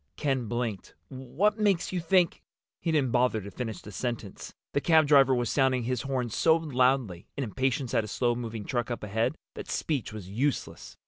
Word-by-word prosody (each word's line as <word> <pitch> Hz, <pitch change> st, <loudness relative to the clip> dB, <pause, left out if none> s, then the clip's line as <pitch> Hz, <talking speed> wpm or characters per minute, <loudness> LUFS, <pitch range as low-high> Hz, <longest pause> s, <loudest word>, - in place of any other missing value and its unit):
Ken 135 Hz, -5 st, -1 dB
blinked. 120 Hz, -4 st, -3 dB
"What 160 Hz, -, -1 dB
makes 200 Hz, -5 st, +2 dB
you 185 Hz, -, -1 dB
think—?" 175 Hz, +1 st, +2 dB, 0.4 s
He 165 Hz, -, -1 dB
didn't 140 Hz, -6 st, +2 dB
bother 125 Hz, -2 st, +2 dB
to 100 Hz, 0 st, -8 dB
finish 115 Hz, -2 st, -5 dB
the 105 Hz, -, -9 dB
sentence. 115 Hz, -4 st, -5 dB, 0.2 s
The 140 Hz, -, +1 dB
cab 160 Hz, -1 st, +5 dB
driver 135 Hz, -3 st, +5 dB
was 120 Hz, -1 st, -1 dB
sounding 130 Hz, -3 st, +2 dB
his 125 Hz, 0 st, -1 dB
horn 130 Hz, -3 st, -2 dB
so 160 Hz, +8 st, +4 dB
loudly, 130 Hz, -, +1 dB
in 140 Hz, -, -1 dB
impatience 130 Hz, +2 st, -1 dB
at 115 Hz, -3 st, +3 dB
a -, -, -6 dB
slow 120 Hz, +3 st, +1 dB
moving 115 Hz, -3 st, -5 dB
truck 120 Hz, -1 st, -2 dB
up 120 Hz, -, -4 dB
ahead, 110 Hz, +7 st, 0 dB, 0.2 s
that -, -, -8 dB
speech 145 Hz, -9 st, -2 dB
was 105 Hz, -4 st, -8 dB
useless. 130 Hz, +9 st, -3 dB
125 Hz, 190 wpm, -28 LUFS, 115-145 Hz, 0.4 s, cab